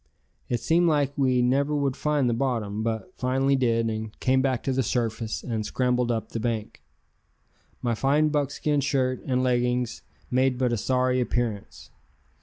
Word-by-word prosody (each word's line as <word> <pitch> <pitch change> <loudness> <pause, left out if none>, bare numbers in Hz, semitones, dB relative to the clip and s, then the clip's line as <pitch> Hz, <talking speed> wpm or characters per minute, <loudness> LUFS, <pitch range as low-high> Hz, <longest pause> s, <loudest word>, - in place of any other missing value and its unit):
It 120 - 0
seemed 170 +1 +3
like 145 -3 +1
we 130 -3 +2
never 140 +4 +2
would 140 -3 0
find 150 -3 +1
the 120 - +2
bottom, 115 -5 -1
but 115 +11 -3
finally 135 +2 +2
did, 115 -3 +1
and 110 -1 -5
came 130 +1 +2
back 130 -3 0
to 135 - 0
the 130 - +1
surface 115 -2 -2
and 110 -3 -2
scrambled 125 +3 0
up 115 -1 -2
the 115 - -4
bank. 110 -2 -3 1.0
My 120 - +1
fine 145 +6 +2
buckskin 145 0 0
shirt 130 -2 0
and 130 -1 +1
leggings 125 -1 0 0.3
made 130 0 +2
but 125 -2 +1
a - - 0
sorry 125 +3 +1
appearance. 120 -4 -3
125 Hz, 165 wpm, -26 LUFS, 115-135 Hz, 1.0 s, seemed